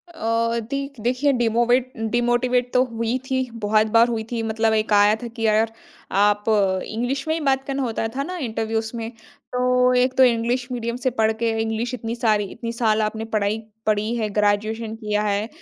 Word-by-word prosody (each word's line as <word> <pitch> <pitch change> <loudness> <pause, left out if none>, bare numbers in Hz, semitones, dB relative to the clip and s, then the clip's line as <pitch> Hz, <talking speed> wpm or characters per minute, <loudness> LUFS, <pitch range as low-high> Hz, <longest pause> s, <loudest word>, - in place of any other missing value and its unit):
अ, 230 0 0
देख 275 -2 -4
देखिए, 255 +5 +1
डिमोवेट 240 +2 +2 0.2
डिमोटिवेट 240 +1 +1
तो 250 0 +5
हुई 230 +2 -1
थी, 260 0 +1
बहुत 215 -1 +2
बार 230 +1 +7
हुई 225 -2 -2
थी। 235 - -1
मतलब 220 0 +1
एक 215 -1 +1
आया 205 +1 +5
था - - -3
कि 225 -1 -4
अ, 215 +1 +4 0.5
आप 205 +1 +3 0.4
इंग्लिश 245 +7 -3
में 315 - +1
ही 330 - -1
बात 265 0 +2
करना 275 0 -1
होता 225 -1 -2
था 275 - -1
ना 365 +3 -5
इंटरव्यूज़ 225 -4 -2
में, 225 -1 -4 0.4
तो 250 0 +3
एक 250 +1 +2
तो 260 - +7
इंग्लिश 240 +1 +1
मीडियम 235 -1 -3
से - - +5
पढ़ 220 0 +3
के 230 - +2
इंग्लिश 225 +3 -2
इतनी 230 -1 -4
सारी 215 -4 +2
इतनी 230 0 -5
साल 220 -2 +1
आपने 220 +1 -2
पढ़ाई 210 +1 +1 0.3
पड़ी 215 +2 0
है, 220 -2 -1
ग्रेजुएशन 215 +2 0
किया 210 -2 -1
है। 205 +1 0
230 Hz, 190 wpm, -22 LUFS, 220-250 Hz, 0.5 s, बार